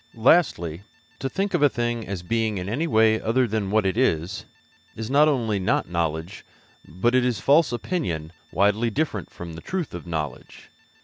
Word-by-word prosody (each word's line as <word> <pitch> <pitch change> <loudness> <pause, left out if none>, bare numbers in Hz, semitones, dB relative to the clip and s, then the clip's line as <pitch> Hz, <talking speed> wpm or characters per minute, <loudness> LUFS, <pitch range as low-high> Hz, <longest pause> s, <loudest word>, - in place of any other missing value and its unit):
'Lastly, 110 - +2 0.4
to 135 - -2
think 195 +7 -2
of - - +1
a 145 - +6
thing 120 -2 -2
as 95 -3 -5
being 110 +2 0
in 90 0 -4
any 140 +11 -1
way 110 -4 +3
other 125 +3 +2
than 105 -2 -2
what 110 0 +2
it 95 - +1
is, 95 -7 0 0.5
is 110 +2 -5
not 145 +2 +5
only 115 -8 +1
not 95 - 0
knowledge, 85 +2 -3 0.4
but 100 +9 0
it 130 -1 +4
is 125 -4 0
false 145 0 +4
opinion 100 - -3 0.2
widely 105 +4 +2
different 110 - -2
from 85 -1 -9
the 80 - -9
truth 185 - -4
of 85 0 -7
knowledge. 75 -5 -6
110 Hz, 180 wpm, -24 LUFS, 90-130 Hz, 0.5 s, a